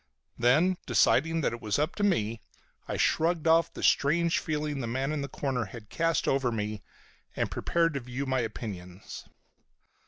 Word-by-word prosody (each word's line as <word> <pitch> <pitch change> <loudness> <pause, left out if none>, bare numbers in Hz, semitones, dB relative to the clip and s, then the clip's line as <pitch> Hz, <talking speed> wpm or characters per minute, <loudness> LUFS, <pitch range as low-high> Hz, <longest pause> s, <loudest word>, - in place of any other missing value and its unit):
Then, 155 +10 +3
deciding 165 +4 +3
it 115 -2 -1
was 105 -1 0
up 150 +3 0
to - - -2
me, 115 - +1 0.5
I - - -3
shrugged 165 0 +1
off 165 0 +4
the - - -8
strange 165 +4 +3
feeling 150 -2 -2
the 120 - -3
man 130 +5 -1
in 155 -2 -2
the 140 - -3
corner 130 -3 -2
had 105 +2 -11
cast 165 0 0
over 135 -3 +1
me, 105 -2 -3 0.5
and - - -1
prepared 165 -1 +1
to 140 - -2
view 125 +2 -5
my 130 -1 0
opinions. 100 -5 -6
135 Hz, 165 wpm, -28 LUFS, 115-160 Hz, 0.5 s, off